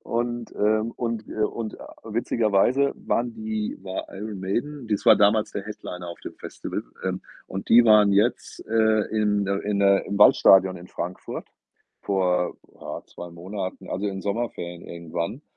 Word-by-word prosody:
und, 120 0 -3
ähm 110 +2 +2
und 115 -2 -3
wir 110 -1 -1
und, 110 -2 -5
äh, - - -13 0.3
witzigerweise 115 +4 +2
waren 120 0 -1
die 110 -1 -3
war 95 -1 -5
Iron 100 0 -6
Maiden 120 +7 -3
das 105 -2 -1
war - - +10
damals 105 +1 +3
der 100 - -3
Headliner 90 -4 -7
auf 85 - -8
dem - - -8
Festival, - - -5 0.2
ähm, 95 0 -1 0.3
und 95 +1 -6
die 120 +1 +7
waren 105 -2 +6
jetzt, 105 +5 0
äh, 110 -1 +3
in 105 -2 +1
der 100 0 -1
in 105 -1 -1
der 100 0 +4
im 100 - -3
Waldstadion 95 -2 +6
in 90 - -12
Frankfurt 90 +2 -6 0.5
vor, 90 -2 0 0.2
ja, - - -6
2 85 0 -9
Monaten, 95 +3 -6
also, 100 +2 -2
in 100 - -2
den 95 - -6
Sommerferien 100 -5 -3
irgendwann 85 - -5
105 Hz, 165 wpm, -25 LUFS, 95-110 Hz, 0.5 s, war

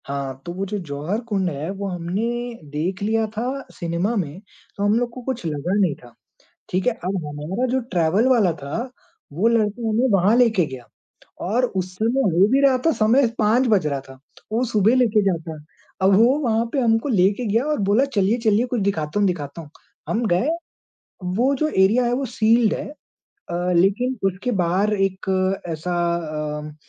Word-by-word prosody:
हाँ, 135 -1 -4
तो 175 - -5
वो 190 +2 -3
जो 205 +2 -3
जौहर 150 +9 -2
कुंड 195 -4 0
है 150 +1 -5
वो 200 +1 -4
हमने 180 +3 -3 0.5
देख 165 +7 -3
लिया 220 +1 +1
था 225 - -1 0.3
सिनेमा 170 +7 -2
में, 175 -5 -3 0.4
तो 200 - -2
हम 205 +1 +3
लोग 245 -1 -1
को 255 - -8
कुछ 250 -6 -4
लगा 155 +3 -2
नहीं 180 -8 +2
था। 120 -1 -17 0.6
ठीक 185 +5 -1
है 250 - +3
अब 195 -3 -3
हमारा 150 +11 -3
जो 260 - +2
ट्रैवल 180 +7 +2
वाला 225 -8 +4
था 220 - -4 0.4
वो 185 +9 +2
लड़का 230 0 +1
हमें 230 +4 +2
वहाँ 195 +4 +4
लेके 225 -8 +4
गया 130 -4 -9 0.6
और 240 +6 +2
उस 185 -5 -4
समय 230 +7 +1 0.2
हो 190 +3 +6
भी 270 +1 +4
रहा 270 -2 +4
था 325 - +5
समय 240 +4 +3
5 230 +4 +3
बज 200 -9 +2
रहा 140 -2 -1
था, 135 -1 -15 0.3
वो 230 +3 +1
सुबह 220 0 +3
लेके 230 -4 +3
जाता। 165 -4 -2 0.4
अब 190 +1 +5
वो 240 +6 +5
वहाँ 230 -5 +1
पे 280 - +1
हमको 230 +2 +2
लेके 200 +2 +2
गया 225 +5 +1
और 300 -3 -1
बोला 230 +7 +4
चलिए-चलिए 215 +3 +2
कुछ 245 -3 -1
दिखाता 175 -3 -1
हूँ 205 - +3
दिखाता 165 -3 -4
हूँ। 150 - -12 0.4
हम 230 +2 0
गए 185 - +1 0.9
वो 260 +5 +2
जो 310 +3 0
एरिया 215 +1 +3
है 240 - 0
वो 270 +2 -1
सील्ड 225 -1 +3
है। - - -5 0.6
अ, 175 +1 -1
लेकिन 210 +9 +2
उसके 195 +6 -3
बाहर 190 +5 +1
एक 195 -2 -1 0.4
ऐसा 165 +2 -3 0.6
अम, 150 0 -8
200 Hz, 185 wpm, -22 LUFS, 175-235 Hz, 0.9 s, हो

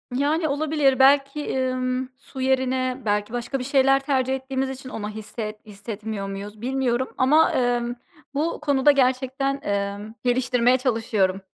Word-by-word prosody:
Yani, 305 +4 +1
olabilir. 290 -2 +1
Belki, 275 +1 +3
ımm, 255 0 -1
su 270 -1 -9
yerine 260 0 0
belki 205 +1 0
başka 245 +3 -3
bir - - -3
şeyler 270 0 +4
tercih 265 -2 +1
ettiğimiz 265 0 -3
için 265 0 -7
onu 210 -3 -5
hisset 215 0 -7
hissetmiyor 210 0 -6
muyuz 205 +2 -7
bilmiyorum 260 0 0
ama, 300 +5 +4
emm, 245 -1 0 0.4
bu 305 +4 -1
konuda 285 -1 +4
gerçekten, 270 +1 0
emm, 200 0 -3
geliştirmeye 250 0 +3
çalışıyorum. 220 -7 0
255 Hz, 135 wpm, -24 LUFS, 225-270 Hz, 0.4 s, şeyler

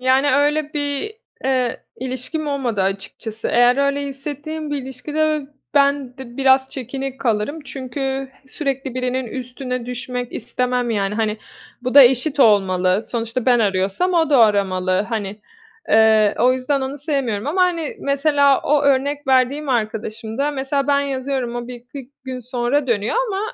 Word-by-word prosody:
yani, 260 +3 +3
öyle 295 +1 +1
bir, 290 +7 -1 0.3
eee, 255 -3 0
ilişkim 260 +5 -4
olmadı 255 -8 -1
açıkçası. 200 +3 -4
Eğer 245 +1 +4
öyle 280 0 +1
hissettiğim 290 +3 -6
bir 290 - -1
ilişkide 265 +4 -3
ö 305 -2 0 0.3
ben 280 -2 +2
de 245 -2 -10
biraz 265 0 +3
çekinik 270 +1 -5
kalırım 230 +6 -1
çünkü 270 0 -4 0.2
sürekli 270 -2 -3
birinin 255 0 -1
üstüne 250 0 -5
düşmek 250 0 -4
istemem, 250 +1 -1
yani, 200 -2 0
hani, 215 -1 -1 0.4
bu 255 +1 -2
da 285 - +11
eşit 265 +3 +3
olmalı. 190 -4 +3
Sonuçta 230 +1 -3
ben 245 -1 +5
arıyorsam 200 - +1
o 325 -2 +2
da 280 - +5
aramalı, 195 -3 +2
hani. 210 -2 -4 0.5
Eee, 220 -1 +5
o 250 +3 +5
yüzden 260 +2 0
onu 265 +2 -4
sevmiyorum 270 -7 -2
ama, 355 +6 +2
hani, 340 -4 0
mesela 280 -1 +3
o 295 0 +2
örnek 280 +1 +1
verdiğim 265 +3 +2
arkadaşımda 225 +2 -2
mesela 275 0 -1
ben 285 -1 +3
yazıyorum, 265 -3 -2
o 240 0 -5
1-2 250 +2 -10
gün 260 -1 -5
sonra 250 +3 -1
dönüyor 225 - 0
ama 390 -2 -2
260 Hz, 150 wpm, -20 LUFS, 235-280 Hz, 0.5 s, da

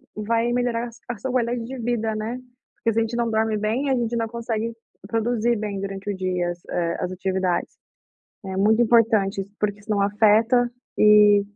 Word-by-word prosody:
vai 230 +3 0
melhorar 240 -1 -1 0.2
a 240 - -3
sua 260 +5 -4
qualidade 240 -1 0
de 265 +3 -7
vida, 225 -2 -1
né. 220 +3 -3 0.4
Porque 230 - 0
se 225 - +2
gente 225 +1 -2
não 235 -1 0
dorme 220 -1 +1
bem 225 +7 -1
a 265 - +3
gente 235 -1 -1
não 230 -1 -1
consegue 230 -1 -3 0.4
produzir 235 +1 +1
bem 205 -2 -4
durante 195 +1 -5
o - - -4
dia 180 -2 -1
as 175 0 -11
eh, 170 -1 -1 0.2
atividades. 185 -1 -1 0.7
É 190 0 -4
muito 215 +4 +4
importante, 220 -4 +3 0.2
porque 205 -1 -1
senão 205 -1 -1
afeta, 220 +4 +3 0.3
eh, 210 -1 +7
220 Hz, 170 wpm, -23 LUFS, 205-235 Hz, 0.7 s, eh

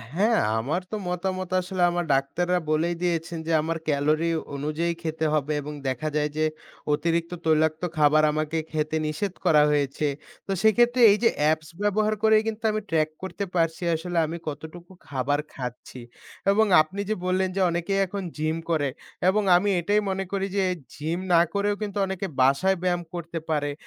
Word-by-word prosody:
হ্যাঁ, 220 +5 +3 0.2
আমার 155 +11 -1
তো - - -2
মতামত 185 +1 -2
আসলে 185 0 -4
আমার 175 0 -1
ডাক্তাররা 175 +7 +1
বলেই 165 +3 +1
দিয়েছেন 170 -1 -1
যে - - 0
আমার 165 +1 -2
ক্যালোরি 155 +3 +1 0.3
অনুযায়ী 155 +4 -1
খেতে 160 -1 -2
হবে 150 0 0
এবং 150 +1 -6
দেখা 130 +4 -1
যায় 150 0 +1
যে 155 - +2 0.5
অতিরিক্ত 170 +2 0
তৈলাক্ত 160 +1 +2
খাবার 155 0 +5
আমাকে 155 +1 -2
খেতে 155 0 -1
নিষেধ 175 +5 -2
করা 150 -2 +6
হয়েছে। 145 0 0 0.4
তো - - -3
সেক্ষেত্রে 240 +3 +4
এই 205 - +3
যে 230 - +6
অ্যাপস 155 +1 +1
ব্যবহার 215 +1 +2
করেই 220 0 +5
কিন্তু 225 +1 -4
আমি 215 0 -2
ট্রাক 155 -1 +2
করতে 195 +2 -4
পারছি 165 +1 +1
আসলে 175 +2 -4
আমি 165 +2 -5
কতটুকু 160 +4 -7 0.2
খাবার 140 +1 0
খাচ্ছি 125 0 -7 0.5
এবং 220 +2 +4 0.2
আপনি 190 +6 -6
যে 215 - +1
বললেন 185 +1 +1
যে 195 - 0
অনেকেই 175 +3 -1
এখন 195 +1 -5
জিম 155 +1 -1
করে 150 -4 +1 0.4
এবং 210 +2 +2
আমি 205 +3 +2
এটাই 205 +5 +2
মনে 190 0 -1
করি 195 -1 -1
যে 195 - +3 0.3
জিম 160 +4 -3
না 170 - +7
করেও 205 0 +1
কিন্তু 205 -1 -4
অনেকে 190 0 -3
বাসায় 140 +9 +3
ব্যায়াম 175 -1 +1
করতে 170 -1 -5
পারে। 145 -2 0
170 Hz, 170 wpm, -25 LUFS, 155-190 Hz, 0.5 s, না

